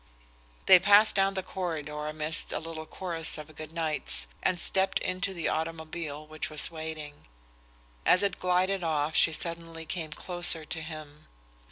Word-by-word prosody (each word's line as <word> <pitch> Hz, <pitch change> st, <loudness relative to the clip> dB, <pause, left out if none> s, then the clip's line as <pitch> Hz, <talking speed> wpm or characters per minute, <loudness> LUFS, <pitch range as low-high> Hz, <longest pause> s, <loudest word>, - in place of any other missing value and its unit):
They 185 Hz, -, +9 dB
passed 205 Hz, +3 st, +6 dB
down 195 Hz, 0 st, +2 dB
the 190 Hz, -, -2 dB
corridor 150 Hz, -5 st, -4 dB
amidst 155 Hz, +1 st, +1 dB
a -, -, -1 dB
little 160 Hz, -1 st, -7 dB
chorus 165 Hz, -4 st, +1 dB
of 155 Hz, 0 st, -10 dB
good 155 Hz, 0 st, -9 dB
nights, 150 Hz, -, 0 dB, 0.2 s
and 180 Hz, -1 st, 0 dB
stepped 190 Hz, +1 st, +3 dB
into 185 Hz, +1 st, -1 dB
the 170 Hz, -4 st, -3 dB
automobile 160 Hz, -1 st, -4 dB
which 155 Hz, 0 st, -5 dB
was 155 Hz, +1 st, -4 dB
waiting. 155 Hz, -, -7 dB, 0.8 s
As 185 Hz, -, +4 dB
it 200 Hz, -2 st, -1 dB
glided 185 Hz, +1 st, +1 dB
off 155 Hz, -1 st, -1 dB
she 160 Hz, -, +6 dB
suddenly 165 Hz, 0 st, -3 dB
came 160 Hz, -1 st, -4 dB
closer 175 Hz, 0 st, +1 dB
to 160 Hz, +1 st, -4 dB
him. 155 Hz, -2 st, -10 dB
165 Hz, 155 wpm, -28 LUFS, 155-180 Hz, 0.8 s, They